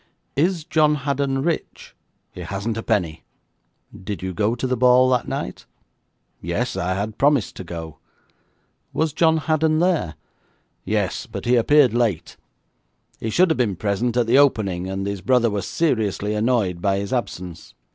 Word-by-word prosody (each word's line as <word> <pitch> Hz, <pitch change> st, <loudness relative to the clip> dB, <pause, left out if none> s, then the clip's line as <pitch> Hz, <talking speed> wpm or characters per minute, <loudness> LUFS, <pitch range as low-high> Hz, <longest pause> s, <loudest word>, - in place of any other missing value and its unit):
'Is 165 Hz, +3 st, +1 dB
John 155 Hz, -1 st, +2 dB
Haddon 140 Hz, -1 st, 0 dB
rich?' 170 Hz, -1 st, -4 dB, 0.4 s
'He -, -, -9 dB
hasn't 100 Hz, +3 st, -3 dB
a 115 Hz, -, -3 dB
penny.' 85 Hz, -9 st, -1 dB, 0.7 s
'Did 100 Hz, 0 st, -6 dB
you 95 Hz, 0 st, -3 dB
go 105 Hz, +5 st, 0 dB
to 125 Hz, -, -4 dB
the 130 Hz, 0 st, 0 dB
ball 125 Hz, +1 st, +5 dB
that 125 Hz, -2 st, +1 dB
night?' -, -, -5 dB, 0.7 s
'Yes, -, -, -2 dB
I 90 Hz, +1 st, -1 dB
had 105 Hz, +2 st, -4 dB
promised 140 Hz, -5 st, +2 dB
to -, -, -6 dB
go.' 85 Hz, -2 st, -8 dB, 0.9 s
'Was 160 Hz, -2 st, 0 dB
John 160 Hz, -1 st, +3 dB
Haddon 155 Hz, 0 st, +1 dB
there?' 160 Hz, -, +1 dB, 0.7 s
'Yes; -, -, -1 dB
but -, -, -7 dB
he 125 Hz, +1 st, +3 dB
appeared 130 Hz, +1 st, +4 dB
late. 115 Hz, -8 st, -1 dB, 0.8 s
He 110 Hz, -, -3 dB
should 175 Hz, +9 st, +3 dB
have -, -, +1 dB
been 115 Hz, -6 st, 0 dB
present 110 Hz, +6 st, -1 dB
at 120 Hz, -, +3 dB
the 125 Hz, +4 st, +4 dB
opening, 100 Hz, -10 st, +1 dB
and 95 Hz, 0 st, -3 dB
his 100 Hz, -1 st, -4 dB
brother 120 Hz, -1 st, +2 dB
was 100 Hz, -2 st, -3 dB
seriously 110 Hz, -, 0 dB
annoyed 105 Hz, -5 st, 0 dB
by 100 Hz, 0 st, +1 dB
his 100 Hz, +3 st, -3 dB
absence. 90 Hz, -8 st, -5 dB
115 Hz, 160 wpm, -22 LUFS, 100-140 Hz, 0.9 s, ball